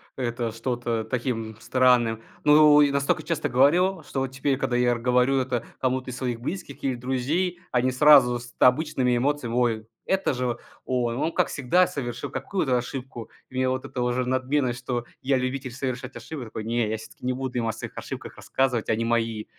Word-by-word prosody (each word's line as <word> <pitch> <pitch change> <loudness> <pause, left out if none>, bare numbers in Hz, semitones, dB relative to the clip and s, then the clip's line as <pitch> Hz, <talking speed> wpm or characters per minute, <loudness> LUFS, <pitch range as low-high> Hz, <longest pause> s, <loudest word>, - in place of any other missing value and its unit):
это 120 -2 -2
что-то 115 -1 -2
таким 115 -2 -3
странным. 120 -3 +3 0.2
Ну, 150 0 +7
и 145 -1 +4
настолько 140 0 0
часто 165 -2 -2
говорил, 165 +7 +3
что 135 - -4
вот 135 - 0
теперь, 130 +1 -1
когда 125 - -1
я 125 0 +3
р 120 - -1
говорю 125 +2 +3
это 125 -2 -2
кому-то 130 0 -1
из 125 - -7
своих 120 -3 -3
близких 165 -1 -6
или 135 -2 +1
друзей, 140 +9 -1
они 125 +1 +2
сразу 125 -3 +6
с 120 0 -11
т - - +3
обычными 125 -2 +3
эмоциями: 130 -2 -1
"Ой, 115 -3 +1 0.2
это 190 -6 +1
же 125 -2 -2 0.3
он, 120 -2 0
он 160 +4 0
как - - +2
всегда 165 +7 +2
совершил 120 -4 -5
какую-то 130 -2 -1
ошибку". 125 -2 -6 0.2
И 130 - -14
меня 130 0 +1
вот 130 0 -3
эта 125 - -4
уже 125 +1 0
надменность, 130 -1 0
что 120 -1 -3 0.2
я 135 0 +2
любитель 130 0 -3
совершать 130 0 -4
ошибки 145 -6 -7
Такой: 110 0 -6
"Не, 115 -1 0
я 110 - -1
всё-таки 110 +3 -12
не 125 - +1
буду 130 -1 -4
им 115 -2 0
о - - +1
своих 110 - -8
ошибках - - -7
рассказывать. 125 -4 -1
Они 115 +1 +1
мои, 115 -2 0
125 Hz, 195 wpm, -25 LUFS, 120-135 Hz, 0.3 s, Ну